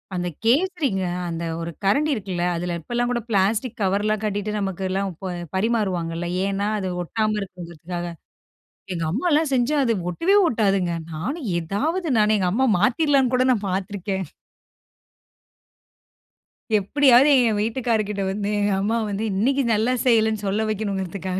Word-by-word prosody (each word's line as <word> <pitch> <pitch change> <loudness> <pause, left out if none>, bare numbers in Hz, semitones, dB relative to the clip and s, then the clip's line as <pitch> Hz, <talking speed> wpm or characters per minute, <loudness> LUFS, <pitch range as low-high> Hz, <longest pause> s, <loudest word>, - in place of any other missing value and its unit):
அந்த 180 0 -2 0.2
கேசரிங்க, 280 - +1 0.3
அந்த 170 0 -4 0.2
ஒரு 170 +1 -4
கரண்டி 290 +10 +2
இருக்குல்ல, 185 -4 -3
அதுல 175 +1 -2
இப்போலாம் 240 +7 -1
கூட 240 -1 -1
பிளாஸ்டிக் 220 +4 0
கவர்லாம் 205 +2 +1
கட்டிட்டு 205 0 -2
நமக்குலாம் 195 0 -2
இப்ப 185 +2 -6 0.2
பரிமாறுவாங்கல்ல. 185 -6 -1 0.2
ஏன்னா, 200 +1 -1
அது 190 -2 -3
ஒட்டாம 215 +3 -1
இருக்குங்கறதுக்காக. 175 -2 -7 0.9
எங்க 165 -1 -3
அம்மாலா 300 - +2
செஞ்சா 255 +4 +2
அது 230 -2 +2 0.2
ஒட்டவே 345 - +2
ஒட்டாதுங்க. 195 - +1 0.2
நானும் 260 - -4
எதாவது 305 - -2
நான் 215 0 +4
எங்க 185 - 0
அம்மா 260 +7 +2
மாத்திடலாம்ன்னு 265 - +2
கூட 255 0 +3
நான் 210 -5 0
பார்த்துருக்கேன். 190 0 -3 2.5
எப்படியாவது 265 +5 +5 0.2
என் 210 -1 0
வீட்டுக்காரர் 225 -1 0
கிட்ட 200 -1 -3
வந்து, 200 +1 -2
எங்க 205 0 +1
அம்மா 225 +3 0
வந்து 205 +2 -3
இன்னைக்கு 265 +7 +2
நல்லா 225 +4 +2
செய்யலன்னு 220 -3 +2
சொல்ல 210 +3 0
வைக்கணுங்கறதுக்காக 190 -3 -3
205 Hz, 130 wpm, -23 LUFS, 190-240 Hz, 2.5 s, எப்படியாவது